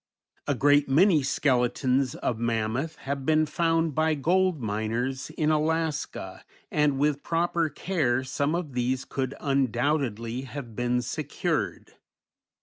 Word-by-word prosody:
A 145 - +1
great 145 +2 +4
many 160 +3 +5
skeletons 130 -1 +1
of 115 -3 -2
mammoth 115 +7 -1
have 140 0 -2
been 155 +2 +3
found 165 0 +1
by 155 +2 +2
gold 180 +3 +2
miners 115 +5 -2
in 155 -1 0
Alaska, 155 0 -1 0.3
and 150 -2 +2
with 145 0 +1
proper 170 -1 0
care 145 -6 0
some 140 +4 -1
of 165 -6 -4
these 125 +2 -1
could 135 0 -3
undoubtedly 130 -3 0
have 130 -4 -8
been 125 +1 0
secured. 120 - -3
140 Hz, 125 wpm, -27 LUFS, 125-155 Hz, 0.3 s, many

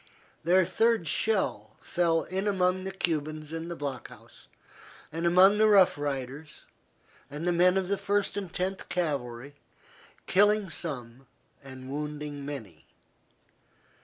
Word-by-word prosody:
Their 180 +3 +4
third 220 0 +1
shell 155 - -1
fell 165 -2 +1
in 190 +3 -3
among 185 -1 +1
the 190 - -3
Cubans 155 -4 -3
in 165 0 -4
the 170 - -4
block 140 -5 -5
house - - -17 0.6
and 165 +2 -1
among 190 +4 +6
the 215 - +6
Rough 200 -4 +6
Riders 145 +1 -5 0.6
and 150 +4 -5
the - - +3
men 180 +2 +4
of 190 -1 0
the 200 +1 0
First 200 0 0
and 195 -4 -4
Tenth 190 +2 -3
Cavalry, 140 -6 -3 0.7
killing 205 -1 +3
some 130 -5 -6 0.4
and 130 -1 -10
wounding 150 0 -5
many. 115 - -8
165 Hz, 130 wpm, -28 LUFS, 145-190 Hz, 0.7 s, among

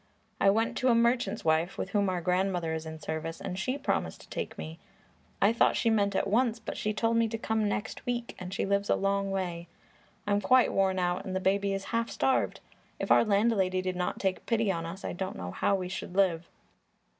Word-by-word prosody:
I 195 - +5
went 225 +3 +1
to 255 - +1
a 240 - +5
merchant's 235 -4 +1
wife 160 +3 +1
with 190 - -4
whom 200 -2 +2
our 180 -1 -1
grandmother 180 -1 0
is 160 0 -4
in 160 0 -6
service 160 +1 -5
and 185 - -4
she 255 +8 -1
promised 80 - -2
to - - -16
take - - -5
me. 80 +1 -7 0.6
I 205 +3 +4
thought 230 - +3
she 230 - +2
meant 200 -2 +2
at - - +1
once, 230 +3 +2
but 230 - -6
she 215 - -1
told 225 +2 +1
me 230 0 +3
to 225 +1 -3
come 220 -1 0
next 205 +1 -4
week, 240 -1 -3
and 180 0 -6
she - - -1
lives 200 +1 0
a - - +4
long 195 0 0
way. 175 -3 -3 0.6
I'm 205 0 +1
quite 255 +5 +4
worn 190 -1 +2
out, 180 0 0
and 185 - -5
the - - +1
baby 195 +1 +1
is 195 0 -2
half 230 0 +1
starved. 265 - 0 0.4
If - - -2
our - - +7
landlady 200 -3 +2
did 185 0 -2
not 180 0 -2
take 190 -1 -2
pity 225 -3 +2
on 165 -2 -3
us, 190 +4 -7
I - - -3
don't 185 +1 -4
know 90 -1 -5
how 200 - +1
we 185 -2 -3
should 185 0 -6
live." 175 -4 +2
195 Hz, 225 wpm, -29 LUFS, 180-220 Hz, 0.6 s, our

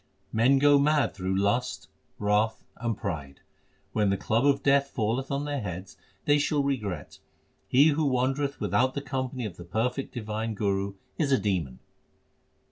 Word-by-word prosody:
Men 125 +5 +4
go 145 +1 +6
mad 150 0 +2
through 95 -1 -2
lust, 120 +6 0 0.3
wrath, 105 +2 +1
and 115 -2 -2
pride. 70 -8 -5 0.5
When 105 -2 +2
the 100 - +1
club 115 +8 +1
of 140 -1 +2
death 140 0 +4
falleth 120 +5 -1
on 140 +1 -1
their 145 -2 -2
heads, 90 -1 -6 0.3
they 145 0 +4
shall 145 0 +1
regret. 115 -10 -3 0.5
He 140 +5 +6
who 155 +1 +1
wandereth 135 +2 0
without 115 +6 +1
the 140 - -2
company 130 -2 -3
of 100 - -6
the 85 - -8
perfect 125 +9 -2
divine 110 -1 -3
Guru 100 -1 -1 0.2
is 145 -4 +1
a 135 - +5
demon. 90 - -1
120 Hz, 160 wpm, -27 LUFS, 100-140 Hz, 0.5 s, go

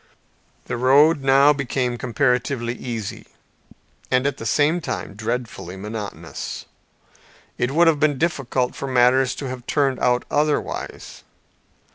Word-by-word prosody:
The 120 - -3
road 140 +5 +5
now 135 +2 +5
became 130 -3 -2
comparatively 125 -1 0
easy, 115 -4 -6 0.8
and 125 +1 +2
at 140 - 0
the 115 - -5
same 155 +4 +2
time 125 -7 -5
dreadfully 110 -4 -4
monotonous. 105 +1 -6 0.9
It 125 - +1
would 165 +5 +4
have 160 -3 +3
been 145 -2 +2
difficult 135 -5 -1
for 140 - -5
matters 130 +1 +3
to 135 - -5
have 125 -1 -8
turned 135 -4 +1
out 125 0 +1
otherwise. 150 0 -2
130 Hz, 125 wpm, -22 LUFS, 120-145 Hz, 0.9 s, road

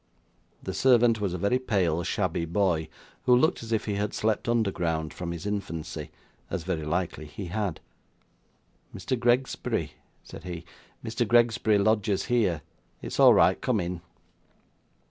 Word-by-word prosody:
The - - -4
servant 120 -4 +4
was 95 -3 -1
a - - -2
very 100 +8 +1
pale, 95 -10 +1
shabby 85 0 -1
boy, 85 -3 0 0.4
who 125 -1 +6
looked 160 +8 +2
as 115 0 -8
if 110 -1 0
he 105 - -1
had 100 +1 -2
slept 110 +1 0
underground 85 -9 0
from 85 -1 -5
his 85 +2 -6
infancy, 100 -6 -4 0.4
as 85 - -3
very 85 -3 -2
likely 80 -1 -2
he 95 +6 -7
had. 100 -6 -2 1.2
'Mr. 130 - -2
Gregsbury?' 125 +2 0 0.3
said - - -11
he; 85 -2 -6 0.4
'Mr. 115 +1 -1
Gregsbury 115 -2 +3
lodges 105 -1 +1
here. 100 - +1 0.4
It's - - -5
all - - +8
right. - - +4
Come 125 -4 +1
in! 90 -1 -3
100 Hz, 145 wpm, -27 LUFS, 85-115 Hz, 1.2 s, all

